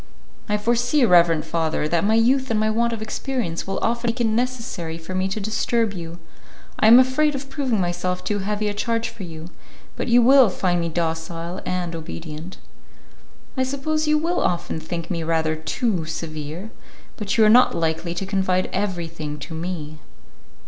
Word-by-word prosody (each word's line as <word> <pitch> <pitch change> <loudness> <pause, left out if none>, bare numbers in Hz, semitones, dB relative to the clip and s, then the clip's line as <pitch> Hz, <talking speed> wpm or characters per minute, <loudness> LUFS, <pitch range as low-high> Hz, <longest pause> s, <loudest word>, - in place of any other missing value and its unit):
"I 210 - +2
foresee, 240 +5 +2
reverend 170 -5 +4
father, 160 -2 -1
that 170 +1 +1
my 215 +2 +3
youth 260 +4 +3
and 220 -2 +1
my 215 0 +2
want 235 +2 +1
of 225 -2 -4
experience 220 -7 -3
will 195 - -2
often 235 +1 0
make 235 +2 -1
it 240 - +2
necessary 225 -8 -2
for 165 +3 -8
me 185 +1 0
to 195 +3 -3
disturb 220 +1 0
you. 170 -2 -7 0.6
I 215 - +5
am 230 +2 +10
afraid 275 +3 +3
of 270 0 -7
proving 265 -6 0
myself 180 0 -1
too 205 -1 -1
heavy 210 +2 -1
a 205 - -1
charge 230 +2 -1
for - - -12
you, 165 -2 -8 0.5
but - - -3
you 240 0 +5
will 260 -2 +7
find 180 -1 0
me 170 - -1
docile 165 +2 -3
and 180 -2 -2
obedient." 160 +1 -7 1.0
"I 260 - 0
suppose 280 +4 -1
you 305 0 +4
will 335 +3 0
often 170 -2 -1
think 170 +2 -5
me 170 -2 -1
rather 160 -1 0
too 175 +3 -1
severe; 160 +4 -6 0.4
but 210 0 -2
you 220 - +6
are - - +6
not 245 +3 +6
likely 165 +1 -1
to 195 - -3
confide 190 -1 0
everything 170 -6 -3
to 150 +3 -8
me." 160 -2 -5
190 Hz, 180 wpm, -22 LUFS, 165-235 Hz, 1.0 s, am